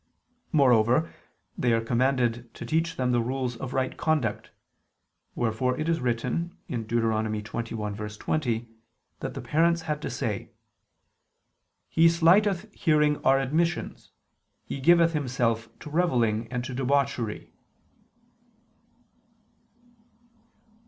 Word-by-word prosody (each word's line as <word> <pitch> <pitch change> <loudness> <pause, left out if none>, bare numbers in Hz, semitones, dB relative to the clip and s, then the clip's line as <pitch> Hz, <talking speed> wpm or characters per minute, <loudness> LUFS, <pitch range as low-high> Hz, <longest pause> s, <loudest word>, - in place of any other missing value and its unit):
Moreover, 130 0 +3 0.4
they 120 -2 +1
are 115 - +3
commanded 120 -1 0
to - - -7
teach 165 +1 0
them 125 -1 0
the 120 -1 +2
rules 125 0 -2
of 125 +2 -6
right 130 -1 -1
conduct: 145 -10 -1 0.9
wherefore 120 +2 0
it 155 - -2
is 165 0 +1
written 140 +9 -2
(Deut. 115 -4 -4
21:20) 110 +2 -2 0.5
that - - -5
the - - -5
parents 170 +2 +2
had 150 -2 -3
to - - -3
say: - - -3 1.4
"He 165 +1 +4
slighteth 190 +4 +3
hearing 150 -3 +2
our 135 +1 +5
admonitions, 160 +6 -1 0.6
he - - -5
giveth 170 +3 +5
himself 120 -6 -1
to 150 - -9
revelling 120 -10 +1
and 125 -1 -2
to 130 - -5
debauchery." 130 -3 -1
130 Hz, 105 wpm, -27 LUFS, 115-160 Hz, 1.4 s, our